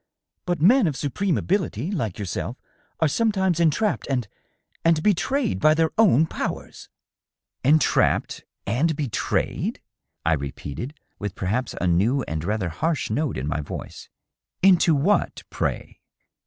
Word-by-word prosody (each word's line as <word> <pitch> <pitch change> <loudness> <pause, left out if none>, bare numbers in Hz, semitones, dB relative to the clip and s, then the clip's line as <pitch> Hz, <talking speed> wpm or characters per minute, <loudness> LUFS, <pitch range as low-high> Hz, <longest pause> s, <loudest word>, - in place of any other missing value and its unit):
" - - -57
But 175 -3 0
men 215 - +5
of 150 - -1
supreme 165 +7 0
ability, 170 - -1
like 115 - -2
yourself, 100 -5 -4 0.4
are 160 - +5
sometimes 190 -1 +1
entrapped 170 +6 +1
and.. 125 -5 0 0.6
and 165 -2 +3
betrayed 225 +5 +1
by 155 +1 +5
their 160 0 +2
own 175 - +5
powers." - - -5 0.4
" - - -61
Entrapped 150 +4 +2 0.2
and 145 +10 +1
betrayed 140 -6 -1 0.2
?" - - -54
I 80 - +4
repeated, 70 - -5 0.2
with 100 -2 -4
perhaps 115 +7 -2
a - - -1
new 105 +10 +2
and 80 -1 -4
rather 100 -1 -1
harsh 155 - -1
note 145 - -1
in 65 +3 -3
my 75 0 -1
voice. 70 - -8 0.5
" - - -43
Into 180 -4 +5
what, 175 +9 +1
pray - - -3
150 Hz, 145 wpm, -24 LUFS, 105-175 Hz, 0.6 s, men